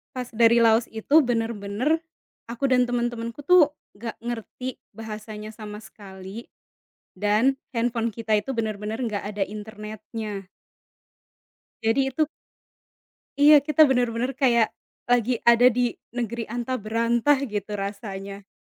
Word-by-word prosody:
Pas 250 -1 -5
dari 230 0 +5
Laos 225 +1 +4
itu 280 +8 +4
benar-benar, 230 +3 0 0.5
aku 240 +4 -2
dan 250 -1 +4
teman-temanku 240 +1 -3
tuh, 315 -2 +5 0.2
nggak 230 +1 -5
ngerti 240 +2 -5 0.2
bahasanya 215 -1 -7
sama 215 -1 -9
sekali. 195 +1 -10 0.7
Dan, 215 +6 +2 0.2
handphone 230 -1 0
kita 220 0 -1
itu 210 +5 0
benar-benar 220 -2 -3
nggak 210 -3 -3
ada 205 -1 -2
internetnya. 210 -1 -7 1.4
Jadi 230 +5 +2
itu 310 +4 +1 1.1
Iya 295 +1 +8
kita 305 +1 +6
benar-benar 245 -2 +1
kayak 240 -4 +3 0.4
lagi 245 0 +2
ada 235 +1 +6
di 245 -1 +2 0.2
negeri 235 -1 -3
antah 245 +3 -3
berantah 230 +5 +2
gitu 210 -5 -4
rasanya. 200 -1 -6
230 Hz, 115 wpm, -25 LUFS, 215-245 Hz, 1.4 s, Iya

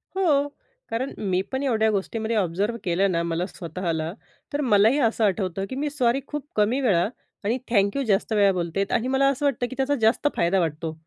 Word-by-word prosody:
हो. 295 -7 +2 0.4
कारण 245 +4 -2 0.2
मी 185 0 +2
पण 265 +1 -2
एवढ्या 220 -5 +2
गोष्टींमध्ये 220 +3 -2
ऑब्झर्व्ह 200 +4 0
केलं 185 +2 +1
ना 170 -1 +1
मला 170 +1 -1
स्वतःला. 165 -2 -3 0.4
तर 290 - 0
मलाही 225 +3 +4
असं 230 -2 +1
आठवतं 195 -1 -1
की - - -5
मी 290 +2 -1
सॉरी 270 -2 +1
खूप 295 -1 -5
कमी 215 +5 +2
वेळा 195 -8 +3 0.4
आणि 225 +5 0
थँक्यू 205 +4 +2
जास्त 220 -1 +1
वेळा 200 -2 +5
बोलते 180 +1 -1
आणि 245 - +1
मला 270 +1 +3
असं 280 +1 -1
वाटतं 255 -3 +1
की 260 - -7
त्याचा 275 +2 +1
जास्त 225 +6 +3
फायदा 175 +3 +2
वाटतो 160 -1 -2
220 Hz, 190 wpm, -24 LUFS, 185-265 Hz, 0.4 s, वेळा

